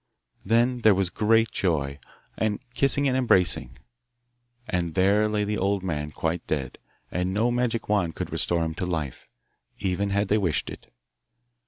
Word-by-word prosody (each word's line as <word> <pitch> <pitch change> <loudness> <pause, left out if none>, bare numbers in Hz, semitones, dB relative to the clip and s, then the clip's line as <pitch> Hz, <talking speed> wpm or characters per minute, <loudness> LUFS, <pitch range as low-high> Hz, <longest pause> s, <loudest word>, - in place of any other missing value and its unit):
Then 120 +4 +2
there 110 -3 +5
was 95 -2 0
great 110 +2 +2
joy, 75 -6 -1 0.4
and 110 -2 -1
kissing 140 +2 +3
and 130 - +1
embracing. 90 - +2 0.9
And 85 -5 -2
there 100 +3 +3
lay 105 -1 0
the 105 0 -2
old 100 0 0
man, 75 -5 -2
quite 80 +3 -3
dead, 70 -5 -3 0.3
and 90 +2 -1
no 115 +3 +2
magic 120 -2 -1
wand 95 -6 0
could - - -5
restore 85 -1 0
him 80 - -3
to 90 - -1
life, 80 -7 -4 0.5
even 95 +2 -1
had 100 +1 +1
they 105 - +3
wished 85 -9 -1
it. - - -12
100 Hz, 160 wpm, -26 LUFS, 85-110 Hz, 0.9 s, there